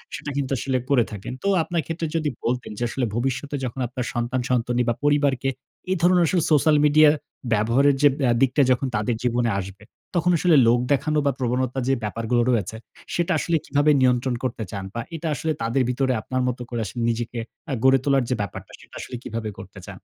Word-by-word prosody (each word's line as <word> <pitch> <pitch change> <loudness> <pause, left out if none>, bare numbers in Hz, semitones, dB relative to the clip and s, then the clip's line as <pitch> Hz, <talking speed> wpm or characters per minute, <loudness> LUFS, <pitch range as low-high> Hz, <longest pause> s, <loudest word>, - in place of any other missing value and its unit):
সেটা 145 - -6
কিন্তু 140 -1 -2
আসলে 130 +2 -1
করে 125 -4 +4
থাকেন। 105 +3 -6
তো - - -1 0.2
আপনার 170 0 -1
ক্ষেত্রে 165 0 -3
যদি 155 -2 0 0.2
বলতেন 125 0 -2
যে 120 - -2
আসলে 125 +1 -1
ভবিষ্যতে 135 +4 -2
যখন 125 +2 -5
আপনার 125 0 -4
সন্তান-সন্তনি 120 0 0
বা - - +2
পরিবারকে 145 -2 +2 0.4
এ - - +4
ধরনের 175 0 +4
আসলে 175 0 +1
social 150 +1 +4
media 150 +1 +6 0.4
ব্যবহারের 125 +7 +3
যে 145 - +7
ব্যা 130 -4 +2
দিকটা 135 +2 +3
যখন 130 +1 +1
তাদের 110 +3 0
জীবনে 120 -1 +1
আসবে, 95 +2 -8 0.3
তখন 175 +1 +2
আসলে 170 0 +3
লোক 120 +1 +4
দেখানো 155 +2 +1
বা 140 - +3
প্রবণতা 130 +1 -1
যে 135 - +3
ব্যাপারগুলো 115 +3 0
রয়েছে, 110 -2 -1 0.4
সেটা 175 +1 0
আসলে 170 - 0
কিভাবে 145 +2 +3
নিয়ন্ত্রণ 125 0 +2
করতে 125 -3 -2
চান? 100 -2 -5
বা 115 - -3
এটা 165 +1 -4
আসলে 160 +4 -2
তাদের 115 +4 +1
ভিতরে 130 +1 +1
আপনার 130 +4 -2
মতো 125 0 -3
করে 120 -2 -3
আসলে 120 +4 -5
নিজেকে 115 +1 -3 0.3
আ - - 0
গড়ে 135 0 +5
তোলার 135 -2 +2
যে 125 - +1
ব্যাপারটা, 100 - -6
সেটা - - -17
আসলে 125 - -7
কীভাবে 110 -1 -4
করতে 95 +1 -11
চান? 100 - -8
130 Hz, 200 wpm, -23 LUFS, 120-145 Hz, 0.4 s, যে